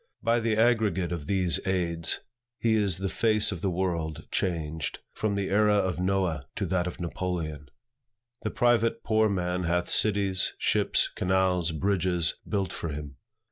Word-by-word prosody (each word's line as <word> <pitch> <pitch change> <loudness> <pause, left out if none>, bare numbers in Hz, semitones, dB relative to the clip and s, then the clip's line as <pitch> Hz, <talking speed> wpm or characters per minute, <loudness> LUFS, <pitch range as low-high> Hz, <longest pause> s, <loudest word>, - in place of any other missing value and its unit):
By 115 +1 +3
the 115 -1 0
aggregate 110 -7 +2
of 80 -4 -4
these 90 -5 +2
aids, 85 -3 0 0.4
how 115 - +3
is 105 -5 +2
the 95 +1 -2
face 110 +1 +3
of 90 -4 -5
the 95 - 0
world 85 -4 -2
changed, 80 -3 -2 0.2
from 105 -2 -1
the 100 -1 -2
era 105 +1 +4
of 95 -3 0
Noah 90 -6 0
to - - -1
that 90 -1 0
of 90 - -6
Napoleon! 85 -4 -4 0.7
The 110 - -2
private 115 0 +2
poor 110 -1 +3
man 90 -2 -1
hath 85 +1 0
cities, 100 -3 +2
ships, - - +1
canals, 90 -2 +1
bridges, 90 0 +1 0.2
built 100 -2 -1
for 85 - -4
him. 75 -2 -7
95 Hz, 155 wpm, -27 LUFS, 85-100 Hz, 0.7 s, era